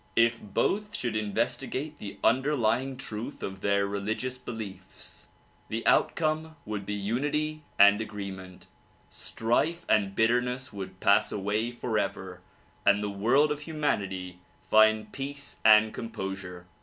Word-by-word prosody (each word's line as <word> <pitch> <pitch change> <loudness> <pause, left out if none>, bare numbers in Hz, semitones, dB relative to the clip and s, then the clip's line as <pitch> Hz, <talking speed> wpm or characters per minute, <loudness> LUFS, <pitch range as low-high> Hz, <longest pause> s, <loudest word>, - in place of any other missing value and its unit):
If 115 0 +3
both 210 - -1
should 120 - -2
inves 110 +1 0
tigate 145 +3 -5
the 100 - -7
underlying 130 -1 +2
truth 120 +1 -6
of 95 -1 -5
their 100 0 +2
religious 105 +6 -2
beliefs, 110 -6 -9 0.4
the 115 +1 -4
outcome 155 0 +2
would 105 -2 -5
be 105 - -2
unity 145 +9 -1 0.2
and 100 +1 +7
agreement; 100 -4 -7 0.5
strife 155 +10 -1
and 100 -2 +2
bitterness 125 +4 +1
would 95 -1 -7
pass 100 +2 +4
away 105 +3 -1
forever 105 -6 -3 0.4
and 100 +1 +4
the 105 - -2
world 125 +10 +3
of 150 - -2
humanity 100 - -2 0.2
find 110 0 +4
peace 140 +1 -6
and 110 0 +6
composure. 95 -5 -6
110 Hz, 125 wpm, -28 LUFS, 100-130 Hz, 0.5 s, and